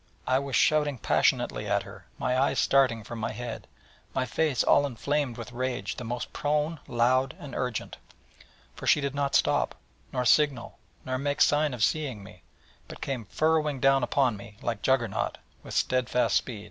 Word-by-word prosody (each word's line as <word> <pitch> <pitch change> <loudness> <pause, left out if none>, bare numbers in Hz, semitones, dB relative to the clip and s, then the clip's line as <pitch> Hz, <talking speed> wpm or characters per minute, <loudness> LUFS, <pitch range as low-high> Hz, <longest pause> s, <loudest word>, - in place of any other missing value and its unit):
I 130 +1 +2
was 140 -2 -3
shouting 150 -1 +3
passionately - - +1
at - - +1
her, - - -13
my 125 - 0
eyes 135 +2 +2
starting 130 -5 +3
from 115 +2 -7
my 110 - -2
head, 120 -2 -6 0.5
my 130 - +1
face 145 -1 +1
all 145 0 +4
inflamed 140 0 -2
with 115 +1 -7
rage 125 -4 -3
the - - -5
most 120 +1 -5
prone, 150 +2 0
loud 130 +2 +2
and 140 -3 -10
urgent. 125 -3 -3 0.8
For - - -7
she - - +5
did 140 -1 -2
not 140 -1 -1
stop, - - +2 0.4
nor 125 - -1
signal, 135 -5 +2 0.3
nor 130 0 -2
make 145 +1 -1
sign 150 0 +4
of 125 -4 -2
seeing 130 -7 0
me, 95 - -14 0.5
but - - -10
came 130 -5 -4
furrowing 155 +3 +1
down 135 +1 +4
upon 125 -1 +1
me 100 +1 -12
like 115 -3 -2
Juggernaut, 120 -6 0 0.2
with - - -8
steadfast 125 0 +1
run. 115 -4 -6
130 Hz, 170 wpm, -27 LUFS, 120-145 Hz, 0.8 s, she